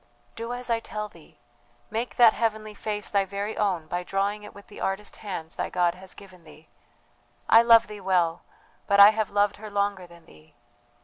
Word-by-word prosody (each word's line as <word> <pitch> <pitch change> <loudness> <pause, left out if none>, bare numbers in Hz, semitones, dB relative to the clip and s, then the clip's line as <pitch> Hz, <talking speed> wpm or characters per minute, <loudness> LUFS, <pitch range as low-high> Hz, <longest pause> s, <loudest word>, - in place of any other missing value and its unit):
"Do 230 +1 -6
as 245 0 -6
I 230 - +2
tell 210 -1 -6
thee, 165 -5 -19 0.5
make 230 +3 -3
that 235 -3 +6
heavenly 215 -2 -2
face 210 0 -5
thy 200 -1 +2
very 200 +2 -5
own 185 -6 -1
by 175 +3 -3
drawing 195 +3 -2
it 210 - -11
with 200 - -13
the - - -12
artist 195 +2 -3
hands 180 -6 -7
thy - - -2
God 175 -1 +1
has 190 0 -13
given 185 -3 -15
thee! 155 0 -17 0.8
I 225 - +7
love 230 -1 +6
thee 210 -1 -10
well, 180 -3 +1 0.5
but 200 0 +3
I 200 +1 +10
have 220 -2 -2
loved 205 0 +1
her 215 0 -9
longer 200 -2 -2
than 170 -1 -18
thee. 155 -1 -20
200 Hz, 195 wpm, -26 LUFS, 180-215 Hz, 0.8 s, I